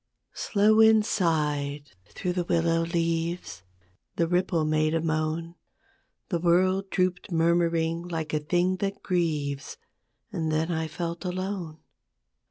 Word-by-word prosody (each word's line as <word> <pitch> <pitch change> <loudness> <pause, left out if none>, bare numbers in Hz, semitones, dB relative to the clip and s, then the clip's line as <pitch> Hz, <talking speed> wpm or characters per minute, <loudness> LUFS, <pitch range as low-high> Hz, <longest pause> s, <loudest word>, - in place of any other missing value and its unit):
Slow 215 0 +2
wind 220 -1 +6
sighed 150 -7 -1 0.2
through 180 +9 -3
the 175 0 -1
willow 165 -1 +2
leaves, 165 - -2 0.5
The 165 - +1
ripple 175 -2 +1
made 155 +1 +1
a - - +2
moan, 160 +1 -2 0.8
The 175 - 0
world 185 +3 +2
drooped 185 +1 -1
murmuring 165 0 +1
like 160 -3 -4
a 155 - +2
thing 175 +4 +1
that 195 +1 -3
grieves; 150 - -1 0.5
And 160 -6 -2
then 160 +2 0
I 160 -1 -1
felt 170 +2 -5
alone. 180 -3 -4
170 Hz, 125 wpm, -27 LUFS, 160-180 Hz, 0.8 s, wind